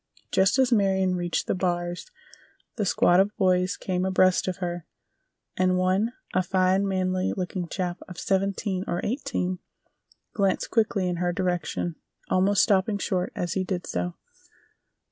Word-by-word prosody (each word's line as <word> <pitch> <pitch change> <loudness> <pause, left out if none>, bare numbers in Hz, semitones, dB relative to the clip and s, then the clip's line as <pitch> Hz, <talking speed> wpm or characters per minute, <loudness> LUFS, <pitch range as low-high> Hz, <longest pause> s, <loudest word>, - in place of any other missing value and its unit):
Just 190 +6 +3
as 260 -1 +3
Marion 190 -4 +2
reached 175 -1 -1
the - - 0
bars 175 - -2 0.7
the 210 - -1
squad 175 0 +4
of 200 +2 +1
boys 185 -2 +2
came 180 -1 -2
abreast 185 -1 +3
of 185 - -2
her, 175 -3 -4 0.7
and 185 0 +2
one—a 185 +2 0
fine, 185 +1 +2
manly 185 -1 0
looking 180 -1 -3
chap 180 0 -3
of 180 - -10
seventeen 195 0 -1
or 175 - -1
eighteen—glanced 195 -3 -3
quickly 215 -4 +1
in 175 -1 -1
her 175 0 0
direction, 175 -2 -2 0.3
almost 190 +2 +4
stopping 200 0 +2
short 185 -2 -1
as 175 -2 -2
he 190 - 0
did 180 -1 -3
so. 90 0 -3
185 Hz, 140 wpm, -26 LUFS, 180-195 Hz, 0.7 s, squad